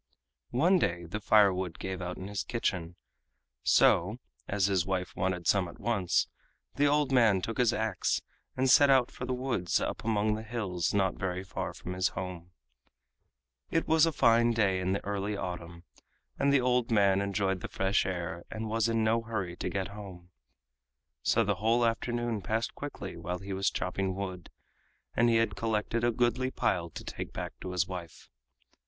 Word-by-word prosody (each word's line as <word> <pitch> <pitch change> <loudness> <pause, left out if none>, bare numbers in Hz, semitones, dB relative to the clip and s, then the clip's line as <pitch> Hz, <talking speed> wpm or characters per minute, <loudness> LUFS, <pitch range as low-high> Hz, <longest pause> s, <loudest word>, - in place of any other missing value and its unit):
One 175 +9 +3
day 85 - -1
the 90 +6 -4
firewood 95 -5 +3
gave 95 -1 -5
out 90 0 -4
in 95 - -6
his 100 -1 -3
kitchen, 90 -8 -2 0.7
so, 95 +7 +4 0.3
as 100 -2 +1
his 95 -3 +2
wife 90 0 -3
wanted 90 -1 -1
some 95 -3 +3
at 85 - -11
once, 100 -5 +1 0.5
the 145 +1 +3
old 145 -1 +2
man 115 -7 +5
took 115 +6 -4
his 120 -2 +4
ax 110 -5 0 0.4
and 130 +1 +2
set 145 +2 +7
out 130 -3 +4
for 125 - -6
the 130 - -1
woods 125 -9 0
up 115 - -3
among 110 -1 +1
the 110 - -3
hills 105 -7 -2
not 95 -2 +2
very 90 -1 -2
far 95 - -4
from 90 - -7
his 95 0 +1
home. 90 -2 -6 1.2
It 165 - 0
was 160 0 +5
a - - +1
fine 115 -4 +4
day 100 -5 +2
in 95 +1 0
the 100 - -3
early 100 +1 -2
autumn, 85 -2 -6 0.6
and 140 0 +3
the 140 -2 +4
old 125 -1 +1
man 100 -3 +4
enjoyed 100 -1 0
the - - -4
fresh 95 +2 +1
air 85 -2 -4
and 110 0 -4
was 115 +1 +1
in 115 -1 +1
no 115 +1 +2
hurry 105 -6 -4
to - - -3
get 95 -1 -2
home. 95 -4 -10 0.9
So - - +3
the 100 -1 0
whole 115 +2 +3
afternoon 120 -1 -1
passed 110 +5 -1
quickly 140 -11 -7
while 85 +2 -4
he 95 +1 -6
was 95 +1 +1
chopping 95 +1 -2
wood, 95 -3 -5 0.7
and 120 +1 +4
he 115 - +3
had 115 0 +2
collected 115 +1 -1
a 120 - +3
goodly 125 +2 +1
pile 90 -8 0
to - - -8
take - - -6
back - - -5
to 95 - -5
his 90 -1 +1
wife. 90 -3 -8
100 Hz, 185 wpm, -30 LUFS, 90-115 Hz, 1.2 s, set